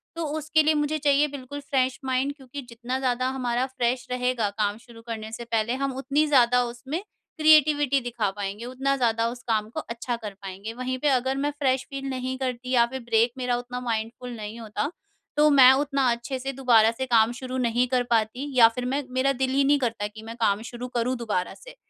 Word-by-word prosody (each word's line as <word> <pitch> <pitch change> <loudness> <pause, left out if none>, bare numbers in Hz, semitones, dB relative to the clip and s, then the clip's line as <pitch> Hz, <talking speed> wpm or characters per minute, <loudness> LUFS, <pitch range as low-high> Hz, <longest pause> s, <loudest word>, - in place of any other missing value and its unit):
तो 335 - -3
उसके 310 +1 +2
लिए 310 +1 +3
मुझे 295 +1 0
चाहिए 290 0 +3
बिल्कुल 285 0 -7
फ्रेश 260 -2 0
माइंड 260 +2 0
क्योंकि 270 +1 -8
जितना 240 +2 -4
ज़्यादा 255 -1 0
हमारा 250 -1 -1
फ्रेश 250 -1 -1
रहेगा 250 -3 0
काम 205 -1 0
शुरू 230 0 -15
करने 220 -1 -5
से 235 +1 -6
पहले 230 0 0
हम 275 0 -2
उतनी 285 +3 +1
ज़्यादा 250 -3 +4
उसमें 245 +6 -5 0.4
क्रिएटिविटी 295 -3 +5
दिखा 235 -4 -1
पाएँगे। 205 +3 -5
उतना 265 +2 -1
ज़्यादा 230 -2 +1
उस 245 +1 -8
काम 215 -1 +1
को - - -5
अच्छा 235 +1 -4
कर 215 -3 -7
पाएँगे। 195 +3 -7
वहीं 255 +2 -3
पे 295 - 0
अगर 265 0 +1
मैं 290 +1 0
फ्रेश 260 -2 +1
फील 275 0 -5
नहीं 260 0 -3
करती 255 -1 -4
या 240 -2 +5
फिर 265 +2 -6
ब्रेक 230 +1 +3
मेरा 250 -1 0
उतना 245 0 -5
माइंडफुल 230 +2 -3
नहीं 215 +1 -7
होता 225 +7 -3 0.5
तो 300 0 +6
मैं 265 -3 +8
उतना 275 0 0
अच्छे 235 +3 -3
से 270 +2 -3
दोबारा 235 -4 +4
से 260 +3 -4
काम 230 -2 +4
शुरू 255 0 -5
नहीं 245 0 +1
कर 250 - +3
पाती 235 +5 0
या 230 -2 +9
फिर 250 - -3
मैं 275 +3 -1
मेरा 260 +2 +2
दिल 260 - +2
ही 275 +1 +3
नहीं 285 +1 +4
करता 230 -5 -1
कि 215 +1 -12
मैं 225 +1 -8
काम 205 -1 +2
शुरू 245 +1 -6
करूँ 240 +2 +1
दोबारा 210 -6 -2
से। - - -14
250 Hz, 210 wpm, -25 LUFS, 230-270 Hz, 0.5 s, या